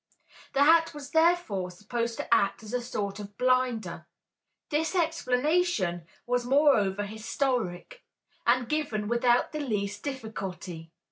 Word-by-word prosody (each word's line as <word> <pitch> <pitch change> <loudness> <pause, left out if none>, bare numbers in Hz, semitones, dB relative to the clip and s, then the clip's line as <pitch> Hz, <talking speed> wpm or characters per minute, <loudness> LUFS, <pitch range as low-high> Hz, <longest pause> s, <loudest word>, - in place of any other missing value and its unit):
The 275 - +4
hat 330 +1 +5
was 290 -1 -8
therefore 320 - +2
supposed 230 +5 -3
to - - 0
act 200 0 +2
as 215 +2 -9
a 250 - 0
sort 205 -4 -4
of 205 -1 -9
blinder. 255 -3 0 0.6
This 315 +4 0
explanation 300 - +1 0.2
was 245 0 0
moreover 240 -7 +3
historic, 225 - -3 0.4
and 245 0 +3
given 245 -8 -1
without 240 +1 +2
the 305 - -4
least 205 -7 -2
difficulty. 195 - -6
245 Hz, 125 wpm, -28 LUFS, 205-290 Hz, 0.6 s, hat